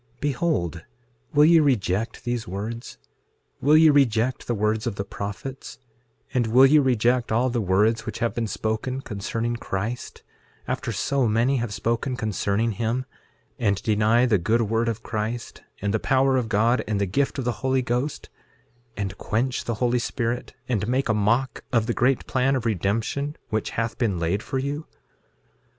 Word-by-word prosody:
6:8 - - -35
Behold, 130 - -1 0.5
will 150 +1 +5
ye 165 +1 +7
reject 115 - 0
these 120 -2 -2
words? 105 +6 -5 0.6
Will 150 +3 +5
ye 160 -1 +7
reject 125 -3 +2
the 120 - 0
words 110 +2 0
of 115 - -2
the 100 - -3
prophets; 105 +8 -7 0.6
and 120 -3 +1
will 125 +4 +7
ye 150 +3 +6
reject 125 -2 +2
all 120 +3 +2
the 120 -1 0
words 105 +4 +2
which - - -4
have 115 - -1
been 115 -1 -2
spoken 110 +5 -2
concerning 115 +1 -3
Christ, 110 +3 -4 0.4
after - - -2
so 135 -3 0
many 115 +5 +2
have 120 -3 -2
spoken 120 +5 -1
concerning 110 0 0
him; 115 +5 -1 0.5
and 100 -4 +1
deny 110 +3 +3
the 110 -6 +3
good 115 +7 +2
word 115 +2 0
of 110 -1 -4
Christ, 110 +2 -4 0.2
and 100 0 0
the 110 - +1
power 135 +2 +2
of 125 -4 0
God, 115 +4 +2
and 105 -2 0
the 100 - +1
gift 135 +11 0
of 135 - -3
the 120 - +1
Holy 130 -1 +1
Ghost, 125 +5 -2 0.7
and 100 -2 -3
quench 120 +4 -1
the 115 - -1
Holy 125 +2 +1
Spirit, 120 0 -3
and 110 -5 -1
make 130 +1 0
a - - +4
mock 115 +5 +1
of 115 -3 +2
the 120 - 0
great 125 +2 +1
plan 135 +1 +1
of 125 -3 -2
redemption, 115 - -1
which 110 -1 -1
hath 115 0 -2
been 110 -7 +1
laid 85 +5 0
for 135 - -4
you? 140 +3 -3
115 Hz, 175 wpm, -24 LUFS, 110-130 Hz, 0.7 s, ye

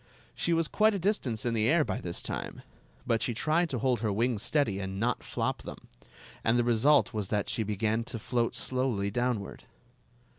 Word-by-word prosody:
She 170 - -1
was 165 -1 +2
quite 215 +4 +3
a - - 0
distance 165 - -1
in 120 - +1
the 110 0 +2
air 155 0 +4
by 95 - -3
this 85 -1 -4
time; - - -5 0.4
but 115 -2 +1
she 120 - -1
tried 160 +7 +1
to 130 - -2
hold 125 +1 +1
her 110 -1 0
wings 115 +1 0
steady 110 -6 +1
and 95 0 -4
not 120 +2 0
flop - - -2
them, - - -8 0.7
and 115 +2 +3
the 120 - +3
result 120 +4 +4
was 105 -3 -2
that 105 +1 -1
she - - 0
began 110 +2 0
to 120 - -6
float 115 +1 -1
slowly 125 -6 -1
downward. 120 -3 -2
120 Hz, 195 wpm, -29 LUFS, 105-135 Hz, 0.7 s, air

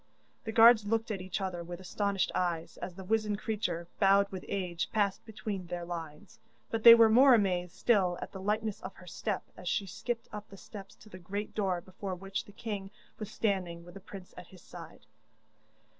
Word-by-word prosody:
The 220 - -3
guards 225 -1 +7
looked 225 +1 0
at 195 -3 -3
each 185 +1 -4
other 180 -3 -3
with 175 +1 -7
astonished 200 +1 -1
eyes, 170 -2 -2
as 180 - -7
the 190 - -8
wizened 210 +1 0
creature, 180 -6 -3
bowed 200 0 +5
with 185 -2 -6
age, 180 -3 -2
passed 200 -3 0
between 210 -4 -5
their 175 0 -4
lines; 165 -3 -8 0.3
but 225 - -1
they 230 +1 +11
were 230 -1 +7
more 250 +4 +7
amazed 180 -5 0
still 190 -7 +2
at - - -7
the 190 - -8
lightness 210 +1 -1
of 190 - -8
her 180 - -14
step 195 +3 -3
as 180 - -5
she 200 - 0
skipped 230 +5 -4
up 210 0 -7
the 195 - -12
steps 195 0 -11
to 215 - -17
the 185 - -10
great 200 +4 -5
door 190 -4 0
before 185 +1 -6
which 195 +3 -5
the - - -14
king 205 -2 -5 0.3
was 215 -2 -5
standing, 185 -6 -2
with 175 - -12
the 195 - -9
prince 195 -1 -11
at 180 -1 -10
his 185 -1 -16
side. - - -12
195 Hz, 205 wpm, -31 LUFS, 180-215 Hz, 0.3 s, they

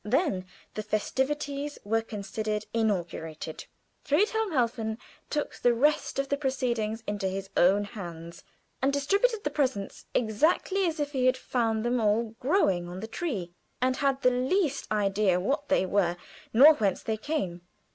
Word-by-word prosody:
Then 210 - 0 0.3
the 215 - -3
festivities 280 +7 -2
were 225 +2 +1
considered 215 0 -4
inaugurated. 170 -8 -2 0.4
Friedhelm 420 +7 +1
Helfen 230 -5 0 0.3
took 295 -1 -2
the 245 -1 +3
rest 295 +6 +2
of 275 0 0
the 280 - +1
proceedings 235 -5 -1
into 205 -2 -2
his 195 +1 -4
own 195 +4 +4
hands; 170 -5 -8 0.4
and 270 +2 +3
distributed 400 - +1
the 295 - -1
presents 260 -9 -2
exactly 315 - +2
as 325 -1 -2
if 290 -1 -1
he 255 -3 +1
had 255 0 +3
found 225 -3 -1
them 240 0 +1
all 215 +1 +1
growing 195 - +2
on 180 +1 -6
the 215 - -5
tree, 220 - -4 0.3
and 255 +1 +1
had 275 -1 +3
not 270 - -24
the 250 - +5
least 275 - 0
idea 200 -3 +2
what 285 +10 -1
they 280 -9 +3
were 180 -3 +1 0.3
nor 280 +7 +9
whence 205 -9 0
they 220 - -1
came. 215 - -3
230 Hz, 155 wpm, -28 LUFS, 205-280 Hz, 0.4 s, nor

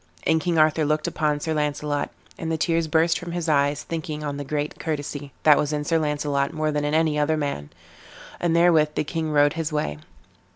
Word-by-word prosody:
And 160 0 +3
King 175 -1 0
Arthur 155 0 +4
looked 155 +1 0
upon 150 -1 0
Sir 160 - -1
Launcelot, 150 -1 -1 0.3
and 165 -1 -4
the 160 - 0
tears 165 0 +1
burst 165 +1 +2
from 175 -1 -7
his 175 -1 -2
eyes, 145 -1 +2
thinking 155 -2 -5
on 145 -1 -3
the 145 - -4
great 145 +2 -3
courtesy 145 -2 -4
that 150 -2 +6
was 150 - 0
in 150 -1 -1
Sir 165 +2 +1
Launcelot 145 -2 0
more 155 -1 0
than 150 0 -1
in 145 +1 0
any 155 -2 +2
other 155 +1 +2
man; 140 - -3 0.7
and 170 -1 +1
therewith 165 -3 +4
the - - +1
king 160 +1 -3
rode 145 0 +4
his 165 -1 -3
way. 75 - -2
150 Hz, 210 wpm, -24 LUFS, 145-160 Hz, 0.7 s, that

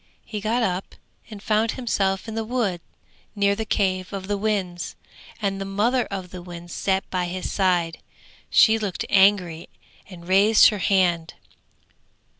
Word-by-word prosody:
He 210 -2 -5
got 230 +3 0
up 185 -2 -3 0.3
and 210 -2 -10
found 220 +1 +1
himself 200 -5 -1
in 220 - -5
the 225 0 -2
wood 220 -7 -1 0.5
near 200 -1 +2
the 220 +1 -4
cave 185 -3 0
of 195 -1 -6
the 205 - 0
winds, 195 -4 -2 0.4
and 195 -2 -2
the - - -1
mother 215 +6 0
of 190 -2 -6
the 180 - -8
winds 175 -1 -9
sat 190 0 -1
by 180 -1 0
his 180 +1 -4
side. 175 -4 +1 0.5
She 225 0 +5
looked 205 -4 -3
angry 190 -4 +3 0.4
and 175 -2 -12
raised 200 +4 +6
her 210 - -4
hand. 175 -4 +1
195 Hz, 155 wpm, -23 LUFS, 180-215 Hz, 0.5 s, raised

